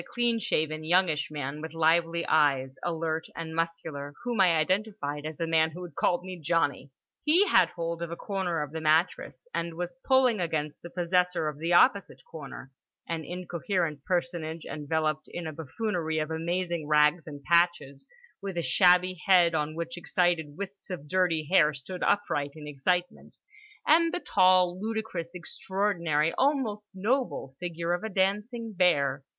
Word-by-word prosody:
One - - -17
was - - -19
a - - -18
clean 240 -1 +2
shaven 155 -5 -1
youngish 165 -2 +2
man 150 -1 -5
with 160 0 -7
lively 165 +1 +2
eyes, 135 -4 +2
alert 160 -1 -2
and 165 -1 -6
muscular, 160 -4 -3
whom 240 -4 0
I 175 -3 +5
identified 155 -4 -1
as 155 -1 -7
the 165 - -1
man 160 -1 +3
who 175 +3 -9
had 175 -3 -9
called 175 +5 +1
me 185 -1 -7
"Johnny." 145 -3 0 0.3
He 350 +7 +4
had 180 - +5
hold 170 -1 -4
of 170 - -3
a 170 - -5
corner 180 -5 -2
of 145 - -8
the 160 0 -5
mattress 160 - +1
and 170 -1 -3
was 175 +1 -4
pulling 260 -5 +3
against 155 -4 -2
the 175 - -9
possessor 180 -1 +1
of 150 -1 -5
the 165 +2 0
opposite 195 +2 +3
corner: 140 -4 -9 0.4
an 165 -1 -3
incoherent 175 -3 -3
personage 170 -2 -2
enveloped 155 +1 -2
in 175 - -5
a 155 - -5
buffoonery 160 - -3
of 155 0 -2
amazing 170 0 -2
rags 150 +2 +3
and 145 -2 -9
patches, 170 -3 +1 0.3
with 195 -3 -5
a 170 - 0
shabby 180 +5 +4
head 175 -3 +6
on 155 0 -1
which 170 +1 -5
excited 170 -4 0
wisps 195 0 -8
of 170 -6 -6
dirty 165 -3 +1
hair 155 -4 +4
stood 175 +7 -8
upright 145 -8 0
in 150 -1 -9
excitement, 175 +6 -2 0.5
and 330 +2 +4
the 355 - -2
tall, 185 - +3
ludicrous, 215 -6 -4
extraordinary, 170 -4 -1
almost 245 -7 0
noble 215 - -1
figure 170 -1 -2
of 175 - -2
a 220 - -3
dancing 210 +4 -1
bear. 140 -7 +2
170 Hz, 165 wpm, -28 LUFS, 155-185 Hz, 0.5 s, head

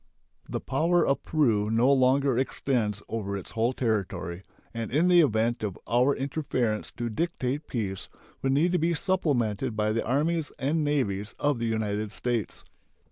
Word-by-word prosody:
The - - -2
power 165 +6 +2
of 140 - +1
Peru 115 -10 +1
no 120 +5 +4
longer 135 0 +3
extends 120 -5 -1
over 100 -3 -3
its 95 - -8
whole 115 +2 +1
territory, 100 -7 -2 0.3
and 115 -1 -4
in 160 +7 +2
the 175 -1 +7
event 115 -3 +1
of 105 -4 -3
our 125 +4 +3
interference 130 -6 -1
to 120 - -2
dictate 140 +2 -2
peace 100 -6 -4 0.3
would 135 0 +1
need 160 +6 +3
to 180 - +2
be 165 +1 +1
supplemented 130 - 0
by 105 0 +1
the 115 +1 0
armies 150 +5 0
and 150 +3 0
navies 105 -9 -1
of 145 -4 +1
the 115 - -1
United 110 -2 -1
States. 120 -3 -3
125 Hz, 160 wpm, -27 LUFS, 110-145 Hz, 0.3 s, the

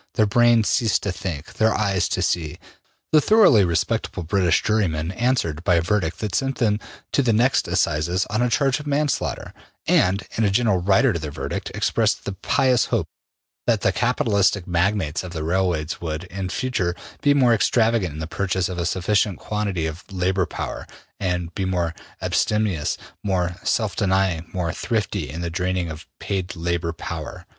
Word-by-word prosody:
Their 110 - +4
brain 120 +1 +4
ceased 110 +1 +1
to 100 - -1
think, 85 -4 -6
their 110 0 +2
eyes 100 -3 +1
to - - 0
see. 80 -3 -1 0.5
The 155 - +6
thoroughly 195 - +6
``respectable'' 90 +1 -1
British 90 -1 +2
jurymen 90 -7 0
answered 95 - 0
by 90 -2 +3
a 85 - +3
verdict 90 -3 0
that 105 -4 -3
sent 135 +5 0
them 105 -3 +1 0.3
to - - +3
the 125 -4 +2
next 120 +5 +2
assizes 85 +6 +1
on 110 +3 -1
a 125 - +2
charge 135 +1 +2
of 150 - -9
manslaughter, 145 0 -1 0.3
and, 95 +2 +3
in 115 - +1
a 105 - +3
gentle 100 -3 +2
``rider'' 100 +6 +3
to 85 - -2
their 75 -1 -5
verdict, 75 - -4
expressed - - +1
the - - -2
pious 125 - +2
hope 105 -9 -1 0.6
that 115 -4 +2
the 95 - +3
capitalistic 100 -5 +1
magnates 90 -2 0
of 90 -1 -7
the 80 -2 -4
railways 85 -2 -1
would, 80 0 -3
in 95 +1 -5
future, 90 -4 -1 0.3
be 145 -1 +4
more 125 -4 +5
extravagant 115 - +2
in 75 - -8
the 80 - -3
purchase 95 +1 -1
of 90 -1 -4
a 85 - 0
sufficient 95 +2 +1
quantity 100 -6 -2
of 80 +2 -5
labor 95 -1 0
power, - - -5 0.3
and 90 -3 -2
more 90 -3 0 0.3
``abstemious,'' 105 -8 0 0.3
more 90 -3 0
``self 110 -4 0
denying,'' 95 -4 +1
more 90 -2 -2
``thrifty,'' 105 -8 -2
in 80 +5 -6
the 85 -1 -3
draining 90 -1 -1
of 80 +1 -9
paid 95 -2 -3
labor 85 0 -1
power. 85 - -7
95 Hz, 175 wpm, -23 LUFS, 85-110 Hz, 0.6 s, The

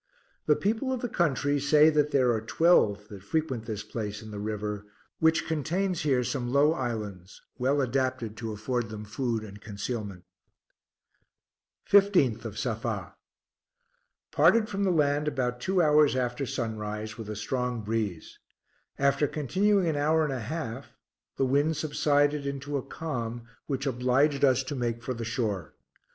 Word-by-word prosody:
The - - +5
people 225 +6 -1
of 255 -2 -2
the 245 - -1
country 145 - +1
say 150 +3 +5
that 150 -1 +2
there 130 -4 +3
are 110 -2 0
twelve 110 - +3
that 100 -2 -9
frequent 130 +1 -2
this 105 -2 -4
place 105 -1 -5
in 110 - -9
the 105 - -6
river, 105 -1 -3 0.4
which 160 0 +3
contains 170 +4 -1
here 135 -4 +2
some 120 -1 -2
low 145 +3 +4
islands, 105 - -5 0.2
well 140 +3 +2
adapted 130 -4 -1
to 115 -1 -4
afford 115 +2 -2
them 105 -1 -7
food 115 +1 -2
and 105 -1 -11
concealment. 105 -3 -5 1.6
16th 175 - +4
of 105 -2 -6
Safa. 110 -6 -3 1.2
Parted 200 +9 +4
from 200 0 -2
the - - +2
land 150 -2 +2
about 125 -4 -1
two 185 +2 +2
hours 150 -2 +5
after 125 +1 -1
sunrise, 110 -2 -4
with 110 -2 -8
a 105 - -4
strong 125 +1 -2
breeze. 105 -6 -3 0.6
After 140 +1 +2
continuing 190 - +1
an 160 -3 0
hour 155 +2 +3
and 150 -3 -1
a 130 - -3
half 130 0 -6 0.4
the 135 - +2
wind 145 +4 +2
subsided 145 -1 +1
into 140 +1 -4
a 140 - 0
calm, 120 -7 -5 0.2
which 135 -1 -2
obliged 135 +3 +2
us 135 -1 +4
to 130 - -5
make 120 -2 -2
for 130 - -2
the 115 -1 -5
shore. 105 - -2
130 Hz, 155 wpm, -28 LUFS, 110-150 Hz, 1.6 s, The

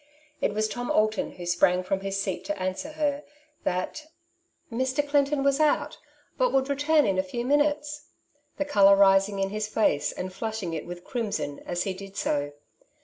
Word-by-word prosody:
It 205 - 0
was 215 0 +1
Tom 245 +3 -5
Alton, 215 0 +1
who 175 - -8
sprang 180 +1 +3
from 190 +1 -1
his 195 0 -3
seat 195 -2 -3
t - - -1
o - - -7
answer 185 +10 -4
her 295 -1 -1 0.4
that 185 +12 -2 0.7
^' - - -5
Mr. 260 +4 0
Clinton 285 0 +2
was 280 +1 +2
out, 305 -1 +1 0.4
but - - +3
would 270 +1 +1
return 290 +2 +3
in 190 -1 +1
a - - +5
few 235 +6 -5
minutes,'^ 295 +1 0 0.5
the 290 - -1
colour 200 -8 +6
rising 195 0 +4
in 195 0 -1
his 215 0 -2
face 215 -9 +1
and 185 0 -6
flushing 220 -4 -4
it 160 - -5
with 175 0 -8
crimson 205 - -3
as 175 0 -1
he 195 - -2
did 195 +1 -10
so. 145 0 -1
215 Hz, 190 wpm, -27 LUFS, 185-285 Hz, 0.7 s, colour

